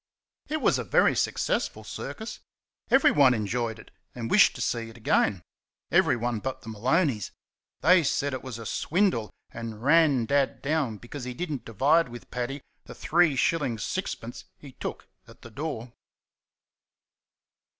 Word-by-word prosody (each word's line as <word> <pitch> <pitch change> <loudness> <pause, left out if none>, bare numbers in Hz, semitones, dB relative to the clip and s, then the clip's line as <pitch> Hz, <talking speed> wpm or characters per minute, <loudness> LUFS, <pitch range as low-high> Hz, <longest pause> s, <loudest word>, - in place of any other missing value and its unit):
It 310 0 -2
was - - +3
a - - -2
very - - +3
successful - - -1
circus. 220 +1 -7 0.5
Everyone 145 - +5
enjoyed 110 +1 -2
it - - -15 0.2
and 115 -2 -5
wished 205 - +6
to - - -8
see 115 -1 -2
it 115 - -13
again 105 -4 +1 0.5
everyone 120 -1 +2
but 130 +3 -5
the 115 - -8
Maloneys. 125 - +1 0.5
They 180 +4 +6
said 140 0 0
it 130 - -4
was 130 -3 -7
a 115 - -8
swindle, 165 - 0 0.2
and 115 -1 -7
ran 145 -4 +4
Dad 140 +2 0
down 140 -7 0
because 125 +5 -9
he 125 -1 -5
did 175 +4 -4
n't 140 - -4
divide 140 +8 +2
with 120 0 -11
Paddy 125 +3 -4 0.2
the - - -10
3s. 170 -2 +3
6d. 135 - -2
he 140 - -12
took - - -7 0.2
at - - -17
the 115 - -11
door. 125 -3 -5
130 Hz, 150 wpm, -27 LUFS, 115-155 Hz, 0.5 s, wished